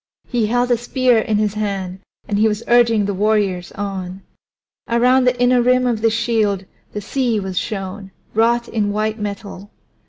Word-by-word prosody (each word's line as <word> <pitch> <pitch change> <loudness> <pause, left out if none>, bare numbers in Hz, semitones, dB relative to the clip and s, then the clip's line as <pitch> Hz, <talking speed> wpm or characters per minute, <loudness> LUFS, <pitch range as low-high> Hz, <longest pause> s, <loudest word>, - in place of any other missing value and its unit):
He 235 -4 0
held 245 +2 +1
a 240 - +4
spear 245 0 +2
in 215 -1 0
his 210 -1 0
hand, 195 -3 -3 0.3
and 205 -1 -1
he 220 - +4
was 210 +1 -2
urging 230 -3 +4
the 200 - -1
warriors 200 -3 0
on. 190 -2 -5 0.7
Around 250 +2 +3
the 250 0 +1
inner 245 0 +4
rim 250 +1 +3
of 235 -3 0
the 225 - +3
shield 220 -4 0 0.3
the 210 - -5
sea 240 0 -1
was 190 -2 -5
shown, 195 +1 -4 0.2
wrought 235 +2 +2
in 210 -2 -1
white 215 +1 -1
metal. 200 -1 -6
215 Hz, 175 wpm, -19 LUFS, 200-240 Hz, 0.7 s, a